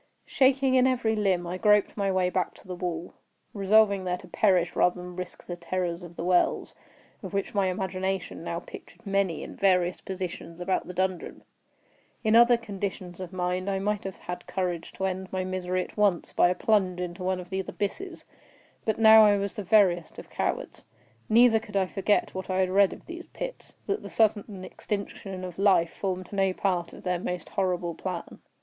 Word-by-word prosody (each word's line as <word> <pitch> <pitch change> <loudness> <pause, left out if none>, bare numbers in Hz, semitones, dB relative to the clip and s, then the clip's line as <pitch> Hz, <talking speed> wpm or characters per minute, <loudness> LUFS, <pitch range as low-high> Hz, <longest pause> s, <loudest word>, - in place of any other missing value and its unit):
Shaking 265 0 +3
in 260 0 +5
every 240 -4 +1
limb, 190 -4 +1
I 180 +2 -4
groped 210 0 +3
my 200 -2 0
way 185 -1 +1
back 180 -2 -1
to - - -18
the 185 - -5
wall—resolving 195 +4 0
there 180 -1 -1
to - - -13
perish 180 -5 +2
rather 180 0 +2
than 180 0 -8
risk 180 -1 -7
the 175 - -5
terrors 175 0 -3
of 175 -1 -10
the - - -5
wells, 180 0 +1 0.5
of - - -7
which 200 - -2
my 200 -2 +2
imagination 190 -2 -3
now 170 0 -3
pictured - - -13
many 195 -4 0
in - - -9
various 180 -2 +2
positions 180 -2 -6
about 185 +1 -1
the 180 - -6
dungeon. 185 -1 -2 0.8
In 220 0 +3
other 240 +1 +7
conditions 195 -5 -6
of 185 -1 -6
mind 180 +1 -2
I 195 - 0
might 205 +1 -1
have 195 -1 -5
had 180 0 -7
courage 180 -3 -3
to 190 - -3
end 190 0 -3
my 185 0 -1
misery 185 0 -2
at - - -13
once 205 -5 +1
by 175 - +4
a 180 - 0
plunge 190 -5 +1
into 180 0 -5
one 185 0 0
of 180 0 -10
these 190 0 -3
abysses; 335 - -4 0.6
but 220 - 0
now 220 0 +8
I 205 -1 +5
was 200 0 -3
the 210 - -4
veriest 180 -4 +3
of - - -11
cowards. - - -3 0.5
Neither 225 0 +6
could 210 -2 -5
I 190 - +3
forget 195 +2 0
what 190 0 -6
I 185 - 0
had 185 -1 +2
read 195 0 +5
of - - -11
these 345 0 -8
pits—that - - -6
the - - -8
sudden 205 -3 0
extinction 195 -2 -5
of 180 -1 -7
life 190 -4 +4
formed 185 -1 -4
no 195 -1 +2
part 180 -3 -1
of - - -12
their 180 -1 0
most 180 0 -4
horrible 180 -3 -1
plan. 180 0 -6
190 Hz, 195 wpm, -27 LUFS, 180-205 Hz, 0.8 s, now